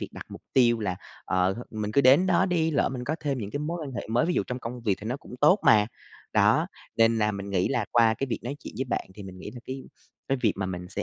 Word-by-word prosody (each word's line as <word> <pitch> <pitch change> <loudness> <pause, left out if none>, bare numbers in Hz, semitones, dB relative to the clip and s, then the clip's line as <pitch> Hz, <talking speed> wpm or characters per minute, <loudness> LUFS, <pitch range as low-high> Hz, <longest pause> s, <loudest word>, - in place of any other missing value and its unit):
việc - - -4
đặt - - -9
mục - - -10
tiêu 120 -3 +4
là, 95 -4 -2 0.3
ờ, 95 +1 +1
th - - -9
mình 105 -1 -3
cứ 140 - +5
đến 140 +7 +6
đó 190 +1 +3
đi, 165 -3 +1
lỡ 145 - +2
mình 125 -2 -5
có 150 - -1
thêm 140 -3 -1
những 105 -4 -5
cái 145 - -3
mối 165 +4 -3
quan 140 - -6
hệ 120 - -5
mới, 120 +5 +2
ví 175 - 0
dụ - - +2
trong 125 0 -4
công 120 +1 -6
việc 105 -4 +1
thì - - -9
nó 125 +3 -2
cũng 130 - -12
tốt 180 +8 +6
mà. 105 -1 +6 0.5
Đó, - - +4 0.3
nên 115 0 +4
là 105 -1 +2
mình 100 0 -6
nghĩ 95 -2 +1
là 120 -4 0
qua 115 -2 +4
cái 135 - -3
việc 125 - -2
nói 140 +4 -4
chuyện - - -10
với 130 - 0
bạn 120 - -3
thì 105 - -9
mình 95 -1 -10
nghĩ 105 - -7
là 120 +2 -10
cái 130 0 -6 0.4
cái 135 - +1
việc 110 - +3
mà 95 -1 -2
mình 90 -1 -5
sẽ 100 +2 -4
120 Hz, 300 wpm, -27 LUFS, 105-135 Hz, 0.5 s, đến